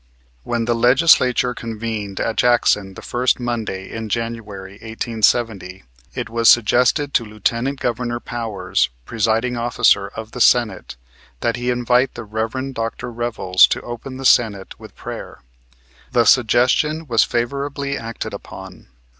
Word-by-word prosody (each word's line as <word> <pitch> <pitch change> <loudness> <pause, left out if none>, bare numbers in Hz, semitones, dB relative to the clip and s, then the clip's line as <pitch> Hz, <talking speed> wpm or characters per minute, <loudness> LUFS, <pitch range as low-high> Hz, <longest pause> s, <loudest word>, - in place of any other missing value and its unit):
When 115 - -2
the 120 - +1
Legislature 125 0 +4
convened 110 -4 -5
at 115 - -1
Jackson 105 -5 +2
the - - -10
first 125 +1 0
Monday 115 -6 -4
in 115 -1 -5
January, 105 -4 -4
1870, 110 -4 -1 0.3
it - - -3
was 115 0 +3
suggested 125 +5 +3
to - - +2
Lieutenant 115 +5 -2
Governor 120 0 -2
Powers, 105 - -2 0.2
presiding 115 - 0
officer 115 -4 +2
of 110 +2 -9
the 125 - -5
Senate, 110 - +2 0.5
that 115 - 0
he 120 0 -3
invite 125 +1 +1
the 120 - -6
Rev. 115 +5 -4
Dr. 115 +1 -4
Revels 115 -6 +3
to - - -2
open 120 +2 -8
the 135 - -7
Senate 105 -6 +2
with - - -13
prayer. - - -8 0.7
The 120 -2 +4
suggestion 130 +7 +3
was 115 -5 +3
favorably 140 +3 -2
acted 115 -2 -6
upon. - - -10
115 Hz, 135 wpm, -20 LUFS, 110-125 Hz, 0.7 s, Legislature